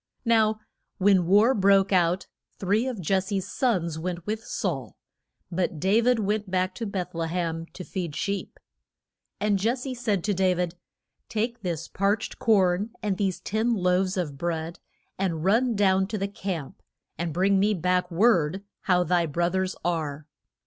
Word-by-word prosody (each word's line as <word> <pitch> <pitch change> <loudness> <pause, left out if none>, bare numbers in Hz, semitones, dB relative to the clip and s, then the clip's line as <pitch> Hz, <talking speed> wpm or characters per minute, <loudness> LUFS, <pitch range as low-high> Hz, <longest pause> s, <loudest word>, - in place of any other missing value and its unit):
Now 220 -2 +3 0.4
when 195 0 +5
the - - +2
war 205 +8 +5
broke 195 -2 +4
out 180 0 +2 0.3
three 205 +6 +1
of 250 -5 -4
Jes 190 -1 +2
se's 195 -2 -2
sons 175 - 0
went 175 0 -4
with 220 +1 -3
Saul, 165 - -3 0.5
but 175 -2 -1
Da 195 +7 +3
vid 250 +1 +3
went 210 -1 -1
back 185 0 0
to 230 +2 -4
Beth 180 -3 -4
le 165 -1 -2
hem 165 -1 -2
to 185 - -7
feed 175 -5 -4
sheep. 200 -2 -3 0.8
And 205 -1 +1
Jes 245 +3 0
se 265 - -3
said 220 -7 -1
to 210 - +1
Da 185 -1 +2
vid, 175 -1 -1 0.6
Take 235 +2 -2
this 170 -4 -3
parched 200 +2 -1
corn 195 -1 +3
and 200 -3 -1
these 195 -3 0
ten 225 +3 0
loaves 185 0 +1
of 150 -6 -3
bread, 165 0 -3 0.4
and 170 -5 -1
run 230 +4 +3
down 190 -1 +3
to 200 -1 -2
camp 185 -7 -5 0.4
and 170 -1 -1
bring 190 +4 +2
me 210 +2 +3
back 180 +1 +1
word 185 -2 +2 0.3
how 180 -1 +5
thy 175 0 +1
broth 170 +4 0
ers 190 0 0
are. 155 -4 -2
190 Hz, 170 wpm, -26 LUFS, 175-210 Hz, 0.8 s, when